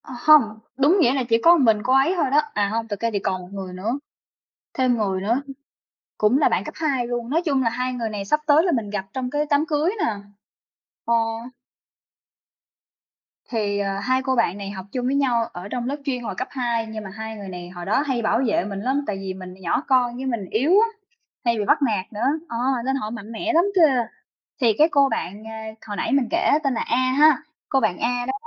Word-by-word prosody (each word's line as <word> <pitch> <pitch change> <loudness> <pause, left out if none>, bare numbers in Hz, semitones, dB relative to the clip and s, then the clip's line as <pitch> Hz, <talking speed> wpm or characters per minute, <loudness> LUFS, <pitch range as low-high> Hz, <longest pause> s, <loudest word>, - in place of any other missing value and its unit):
Ờ - - -10
hông, 305 +2 +7 0.4
đúng 290 +8 +4
nghĩa 260 -7 +4
là 270 -2 0
chỉ 230 - +5
có 335 - +8
một 330 -6 +3
mình 215 -2 +3
cô 255 - +2
ấy 270 +7 +4
thôi 345 - +1
đó, 295 +2 +5
à 205 -1 +1
hông, 225 +1 -2
thực 205 -3 -5
ra 230 - 0
thì 200 - 0
còn 185 -1 -2
một 180 - -11
người 190 -2 -6
nữa 220 +9 -3 0.7
thêm 255 -2 +2
người 195 -3 -1
nữa 230 +7 +1 0.8
cũng 215 +5 +3
là 290 - +4
bạn 185 - 0
cấp - - -7
2 275 -6 0
luôn. 240 -1 -3
Nói 320 +5 +2
chung 275 -4 +2
là 230 - +2
hai 250 +2 -2
người 235 -3 -3
này 205 -2 -5
sắp 300 +10 +2
tới 300 +2 +5
là 360 - +1
mình 230 -8 -1
gặp 200 -2 -3
trong 255 -1 -3
cái 295 +2 0
đám 290 +1 +3
cưới 310 +2 +1
nè. 225 - 0 0.9
Ờ. 235 - +1 2.4
Thì, 210 -3 -1
à, 195 -1 -2
hai 255 +5 +1
cô 260 -1 0
bạn 200 -5 +1
này 200 -1 -6
học 190 -2 -8
chung 250 -1 -3
với 265 +2 +1
nhau 250 -5 +2
ở 180 +2 -7
trong 245 +1 -3
lớp 280 - -1
chuyên 250 -4 -2
hồi 210 - -4
cấp 255 - -3
2, 240 -4 -1
nhưng 220 -1 -7
mà 195 - -8
hai 220 +3 -7
người 200 -2 -8
này 175 -1 -8
hồi 175 -1 -8
đó 210 +8 +2
hay 255 -3 0
bảo 225 +1 +1
vệ 210 -4 +1
mình 200 -1 -5
lắm 265 +7 0
tại 205 - -2
vì 195 -1 -5
mình 185 -1 -9
nhỏ 175 +7 0
con 250 -3 +2
với 260 +2 -5
mình 235 -6 -2
yếu 265 +9 +1
á, 425 +4 +6 0.6
hay 235 -1 +2
bị 210 - -1
bắt - - +3
nạt 215 -7 -1
nữa. 210 - -5 0.3
Ờ, 235 - -3 0.3
nên 265 +1 +1
họ 215 -6 -3
mạnh 225 -1 -8
mẽ 320 +10 -2
lắm 340 +3 +4
kìa! 270 -10 +4 0.5
Thì 235 -4 +4
cái 310 - +6
cô 280 -2 +4
bạn, 200 -1 -4
à, 220 0 -7 0.2
hồi 205 -2 -5
nãy - - -2
mình 275 -3 +2
kể 345 +3 +2
tên 275 -2 +1
là 230 - -2
A - - 0 0.2
ha! 300 +1 +5 0.3
Cô 270 - +2
bạn 215 -7 0
A 245 +1 -1
đó 260 - -1
235 Hz, 240 wpm, -23 LUFS, 210-270 Hz, 2.4 s, có